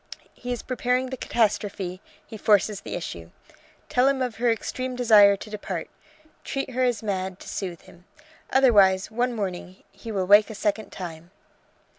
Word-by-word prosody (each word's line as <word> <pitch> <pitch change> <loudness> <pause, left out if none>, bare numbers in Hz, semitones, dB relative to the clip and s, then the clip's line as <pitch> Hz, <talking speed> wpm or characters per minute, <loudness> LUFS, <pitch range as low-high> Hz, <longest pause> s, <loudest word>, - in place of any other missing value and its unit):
He 245 - -7
is 245 - -3
preparing 255 0 -1
the - - -2
catastrophe, 205 -6 -1 0.2
he - - -10
forces 210 -1 +2
the - - -6
issue. 85 - -6 0.6
Tell 250 +1 +3
him 275 -1 +2
of 250 -5 -2
her 240 +1 +2
extreme 255 +3 -2
desire 215 -5 +6
to 210 - -10
depart. 190 -5 -5 0.5
Treat 275 -1 -4
her 255 +1 -2
as 245 -4 +1
mad, 190 -2 -3
to - - -12
soothe 180 -4 -5
him. 175 +1 -18 0.4
Otherwise 205 -7 +4
one 245 +3 0
morning 185 -2 -5
he 230 - -9
will 195 -3 -1
wake 205 +3 +6
a 220 - -7
second 210 +1 -1
time 170 -2 -8
210 Hz, 165 wpm, -25 LUFS, 190-245 Hz, 0.6 s, desire